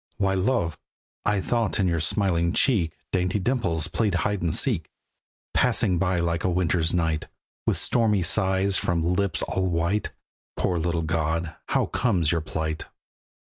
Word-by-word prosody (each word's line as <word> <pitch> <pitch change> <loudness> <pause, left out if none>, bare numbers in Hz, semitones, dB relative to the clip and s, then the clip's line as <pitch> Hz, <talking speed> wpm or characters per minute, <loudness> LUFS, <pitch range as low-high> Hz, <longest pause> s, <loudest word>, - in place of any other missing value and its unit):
Why 95 -1 +1
love! 95 - 0 0.5
I 105 -1 +1
thought 115 0 -1
in 95 - +2
your 85 -1 0
smiling 85 0 +1
cheek 100 - +3 0.2
Dainty 90 +2 0
dimples 95 - -1
played 105 -5 0
hide 100 +2 -1
and 85 -1 0
seek; 85 - +2 0.6
Passing 90 -2 +3
by 90 0 +1
like 85 -1 -1
a - - +1
winter's 85 -2 +1
night, 80 -3 -1 0.4
With - - +2
stormy 110 -6 +1
sighs 95 +1 +3
from 85 0 0
lips 100 +1 0
all 95 0 -1
white. 85 +4 0 0.5
Poor 90 -2 0
little 85 0 -1
god, 80 +1 -1
how - - +1
comes 90 -11 0
your 85 - 0
plight? 80 0 -4
90 Hz, 150 wpm, -25 LUFS, 85-100 Hz, 0.6 s, cheek